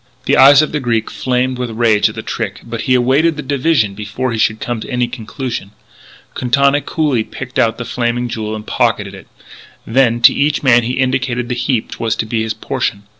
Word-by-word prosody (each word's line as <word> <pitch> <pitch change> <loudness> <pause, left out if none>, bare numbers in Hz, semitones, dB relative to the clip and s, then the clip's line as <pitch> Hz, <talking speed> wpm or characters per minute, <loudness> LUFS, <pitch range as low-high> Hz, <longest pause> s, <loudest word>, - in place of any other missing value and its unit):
The - - +3
eyes 140 +2 +7
of 155 - -3
the 150 - -1
Greek 115 -4 -1
flamed 125 0 -1
with 125 -1 -2
rage 110 -2 +2
at - - -10
the - - -6
trick, - - -4
but 115 -1 -5
he 130 - +5
awaited 135 +7 +2
the 150 - -5
division 135 -6 +1
before 105 +5 -4
he 115 - -3
should 110 0 +1
come 120 -2 -3
to - - -8
any 125 -1 0
conclusion. 120 -3 -6 0.6
Quintana 140 +4 +2
coolly 145 -9 0
picked 130 +3 -6
out 115 0 +2
The 120 - -5
Flaming 120 0 -1
Jewel 110 -2 -4
and 105 0 -8
pocketed 105 -5 0
it. 95 -3 -12 0.6
Then, 120 -1 +2
to - - +7
each 150 +1 0
man 125 -3 +5
he 120 +2 -3
indicated 130 -2 -1
the - - 0
heap 120 -2 -1
which - - -8
was 115 -1 0
to - - -2
be 110 0 -2
his 110 -1 -2
portion. 110 -3 -3
120 Hz, 215 wpm, -16 LUFS, 110-130 Hz, 0.6 s, eyes